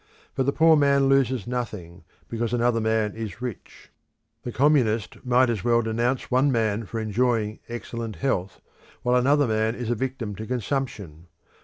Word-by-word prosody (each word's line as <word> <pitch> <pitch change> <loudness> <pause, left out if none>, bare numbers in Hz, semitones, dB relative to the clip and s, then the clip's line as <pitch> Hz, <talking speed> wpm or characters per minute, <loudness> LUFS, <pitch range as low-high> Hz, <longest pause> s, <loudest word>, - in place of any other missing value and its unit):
But 130 -1 -1
the - - +4
poor 160 +2 +5
man 140 -2 +3
loses 130 -4 +2
nothing, 105 -9 -5 0.2
because 115 0 -3
another 120 -1 +2
man 110 -1 0
is 110 -2 -6
rich. 125 -4 -8 0.5
The 120 - -5
Communist 120 -7 +1
might 125 +1 +3
as 115 -5 -2
well 120 0 +3
denounce 120 +3 -1
one 130 +3 +3
man 110 -3 0
for 115 - -4
enjoying 110 0 0
excellent 115 -2 -5
health, 100 -9 -2 0.4
while 125 0 +2
another 140 +4 +3
man 110 +1 0
is 120 -2 -3
a - - +1
victim 125 -3 -3
to 110 - -6
consumption. 110 - -4
120 Hz, 160 wpm, -25 LUFS, 110-130 Hz, 0.5 s, poor